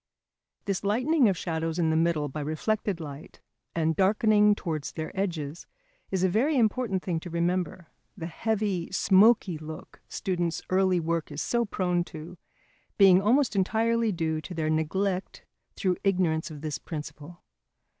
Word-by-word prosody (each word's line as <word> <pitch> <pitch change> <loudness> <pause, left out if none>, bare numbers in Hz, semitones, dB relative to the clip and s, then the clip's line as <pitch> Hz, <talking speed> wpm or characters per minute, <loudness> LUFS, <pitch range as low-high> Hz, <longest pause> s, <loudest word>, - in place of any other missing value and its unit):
This 195 -1 -2
lightening 250 +5 +3
of 190 - -1
shadows 165 -1 -2
in 165 -2 +2
the - - +1
middle 160 -2 +1
by 150 +2 -5
reflected 185 +6 -1
light 145 -1 -9 0.4
and 160 -1 +1
darkening 210 +2 +4
towards 155 -7 -4
their 155 -1 -5
edges 170 -5 -3 0.4
is 190 -1 -1
a - - +5
very 255 - +1
important 220 -4 +1
thing 170 -3 -1
to 175 - -9
remember, 175 0 -2 0.3
the 165 - -5
heavy, 200 0 -2
smoky 195 -3 +4
look 155 0 -10
students' 175 -4 -2
early 185 -1 +3
work 165 -1 -2
is 145 - -3
so 235 0 +1
prone 180 -4 0
to, 165 +2 -10 0.6
being 190 -2 +7
almost 240 +2 +2
entirely 225 +3 +1
due 160 -3 -1
to 175 +3 -8
their 155 -1 0
neglect 185 +5 -1 0.3
through 185 -3 0
ignorance 180 -5 +1
of 150 -2 -9
this 155 -2 -4
principle. 155 +1 -8
180 Hz, 150 wpm, -27 LUFS, 160-205 Hz, 0.6 s, being